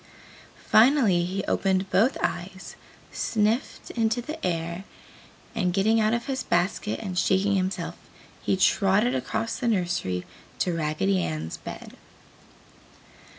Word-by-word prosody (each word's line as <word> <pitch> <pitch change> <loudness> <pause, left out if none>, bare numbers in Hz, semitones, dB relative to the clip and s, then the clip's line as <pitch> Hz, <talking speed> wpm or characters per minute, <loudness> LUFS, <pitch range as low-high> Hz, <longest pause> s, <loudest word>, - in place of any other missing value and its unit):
Finally 220 -7 +5
he 190 +2 -3
opened 190 0 +1
both 230 +8 +3
eyes, - - -4 0.4
sniffed 220 +3 -1
into 225 0 +1
the 305 +6 -7
air 170 +1 -2 0.7
and, 180 -1 0
getting 215 +4 +3
out 215 0 +3
of 235 0 -1
his 265 -1 -2
basket 180 +4 0
and 185 -3 -2
shaking 195 +2 +2
himself, 190 0 -2 0.4
he 195 - 0
trotted 200 +5 +3
across 225 +1 -2
the 250 - -1
nursery 175 - 0 0.3
to 180 - 0
Raggedy 150 - 0
Ann's 80 0 -4
bed. - - -9
195 Hz, 120 wpm, -26 LUFS, 175-225 Hz, 0.7 s, Finally